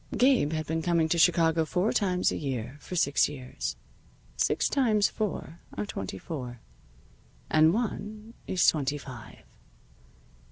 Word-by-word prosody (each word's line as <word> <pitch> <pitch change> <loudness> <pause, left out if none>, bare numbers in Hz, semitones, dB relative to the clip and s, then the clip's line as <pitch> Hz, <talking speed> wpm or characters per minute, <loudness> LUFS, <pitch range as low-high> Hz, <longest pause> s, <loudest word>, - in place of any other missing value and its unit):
Gabe 250 - +4
had 155 0 -2
been 160 +2 -2
coming 170 -1 +2
to 170 - +1
Chicago 165 -1 +4
four 180 +7 0
times 185 -3 +1
a - - -2
year 130 -3 -4
for 180 - -7
six 145 -5 +3
years. 130 -4 -5 0.6
Six - - +1
times 220 -7 +2
four 190 -6 -4 0.2
are 105 - -1
twenty 95 -1 -5
four. 125 - -6 0.9
And 155 +1 +6
one 215 +1 -4
is 185 - +2
twenty 145 -2 +2
five. 130 -5 -11
160 Hz, 135 wpm, -28 LUFS, 140-200 Hz, 0.9 s, And